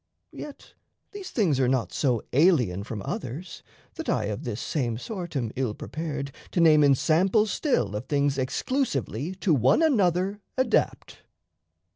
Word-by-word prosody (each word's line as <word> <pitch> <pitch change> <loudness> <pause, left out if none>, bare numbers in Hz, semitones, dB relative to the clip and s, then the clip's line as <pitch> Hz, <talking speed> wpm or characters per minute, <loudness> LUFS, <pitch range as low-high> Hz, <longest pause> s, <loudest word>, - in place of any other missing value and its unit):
Yet 290 -2 -10 0.4
these 405 -2 -8
things 170 - +1
Are 130 - +3
not 125 -7 0
so 125 -6 +1
alien 130 - +3
from 105 -1 -6
others, 140 +9 -5 0.3
that - - -6
I 110 - +1
Of 105 - -5
this 115 -2 -3
same 120 -7 -2
sort 175 - -6
am 120 -5 -1
ill 125 -5 -1
prepared 145 -3 -5 0.2
to - - +1
name 155 -3 +6
Ensamples 175 - +3
still 120 - 0
of 110 +5 -5
things 140 -1 +1
exclusively 145 - -2
To 185 -2 +1
one 130 - +4
another 195 - +2 0.2
adapt. 260 - 0
145 Hz, 145 wpm, -26 LUFS, 125-185 Hz, 0.4 s, name